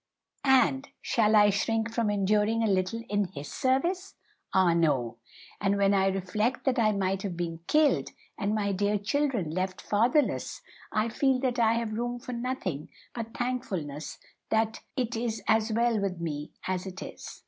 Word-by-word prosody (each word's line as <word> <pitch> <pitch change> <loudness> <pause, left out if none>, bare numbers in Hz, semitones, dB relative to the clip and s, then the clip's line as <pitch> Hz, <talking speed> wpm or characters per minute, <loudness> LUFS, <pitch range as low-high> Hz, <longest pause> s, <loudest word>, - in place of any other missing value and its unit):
And 265 +1 +4
shall 220 -3 +2
I 205 -1 +6
shrink 225 +2 0
from 230 -3 +1
enduring 210 +3 +2
a - - +2
little 195 +3 0
in 205 0 +1
His 150 -6 -8
service? 345 +9 0 0.4
Ah 185 -3 +4
no! 135 -9 +1 0.4
And 200 0 +2
when 200 0 +3
I 195 -1 +3
reflect 195 +6 -1
that 265 -2 +2
I 215 -2 +4
might 195 -1 0
have 190 -4 -4
been 165 -2 -3
killed, 305 -1 +3 0.3
and 210 0 -1
my 200 -2 0
dear 205 +2 +1
children 230 - 0
left 185 +2 -2
fatherless, 240 +8 +1 0.3
I 215 +1 +1
feel 265 +3 +2
that 250 -2 0
I 225 -1 +4
have 230 -2 -2
room 240 +2 -2
for 245 +1 -7
nothing 235 - -3 0.2
but 230 -1 -6
thankfulness 185 - -3 0.3
that 220 0 +1 0.2
it 245 -2 -1
is 225 -1 -2
as 220 0 +3
well 230 0 +2
with 195 -3 -2
me 150 -3 -4 0.2
as 185 0 -2
it 190 +1 -7
is." - - -9
215 Hz, 170 wpm, -28 LUFS, 190-235 Hz, 0.4 s, I